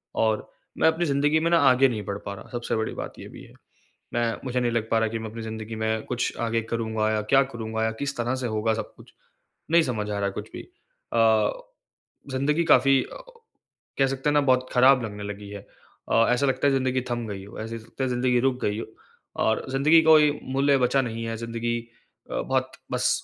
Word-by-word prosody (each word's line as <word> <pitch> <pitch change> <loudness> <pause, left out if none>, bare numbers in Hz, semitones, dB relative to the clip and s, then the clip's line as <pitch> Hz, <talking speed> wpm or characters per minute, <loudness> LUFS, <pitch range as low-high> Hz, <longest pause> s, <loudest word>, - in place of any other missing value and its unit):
और 110 -1 0 0.3
मैं - - +4
अपनी 160 +2 +2
ज़िंदगी 150 +1 +2
में 165 - +1
ना 170 - +6
आगे 130 +1 +5
नहीं 110 -3 -4
बढ़ 100 0 -3
पा 100 - -4
रहा, 100 - -11
सबसे 120 -1 -2
बड़ी 110 0 -2
बात - - -6
ये - - -9
भी - - -12
है। - - -16 0.6
मैं 120 -1 +1
मुझे 125 -1 -1
नहीं 120 -1 0
लग 115 -1 -1
पा 115 - +4
रहा 110 - +2
है 110 - -3
कि 115 - -3
मैं 110 0 -6
अपनी 115 +1 -8
ज़िंदगी 110 0 -6
में 110 0 -1
कुछ 125 -1 -2
आगे 115 0 0
करूँगा 110 -2 0
या 110 0 0
क्या 135 0 +6
करूँगा? 110 -3 -4
या 110 - +1
किस 140 0 -2
तरह 120 +2 -1
से 130 -1 -3
होगा 110 0 0
सब 110 - -5
कुछ? - - -17 0.6
नहीं 170 0 +6
समझ 110 -7 -3
आ - - -2
रहा 100 - 0
है 100 - -1
कुछ - - -7
भी। - - -6 0.5
अ, 110 -2 +4 0.8
ज़िंदगी 145 +5 +1
काफ़ी 135 -2 +5
अ, - - -10 0.8
कह 135 - +4
सकते 135 +2 -2
हैं - - 0
ना, 145 - +5
बहुत 130 -2 +2
खराब 130 +1 +5
लगने 105 -2 -6
लगी 100 0 -7
है 100 -1 -9 0.5
अ, 115 0 +5
ऐसा 125 +3 +2
लगता 135 +1 +1
है - - +3
ज़िंदगी 130 -1 +1
थम 120 -1 -2
गई 100 -2 -6
हो, 100 - -11
ऐसे 115 +1 -5
लगता 115 +4 -6
है 130 - -1
ज़िंदगी 125 0 +2
रुक 130 0 0
गई 105 +1 0
हो - - -6 0.6
और 110 - +1
ज़िंदगी 150 +5 +5
कोई 155 -2 +5 0.2
मूल्य 140 0 +3
बचा 125 +2 +2
नहीं 115 -2 -4
है, 115 0 -3
ज़िंदगी 115 +1 -3 0.5
अ, - - -5
बहुत - - -1 0.2
बस - - +1
120 Hz, 225 wpm, -25 LUFS, 110-135 Hz, 0.8 s, ना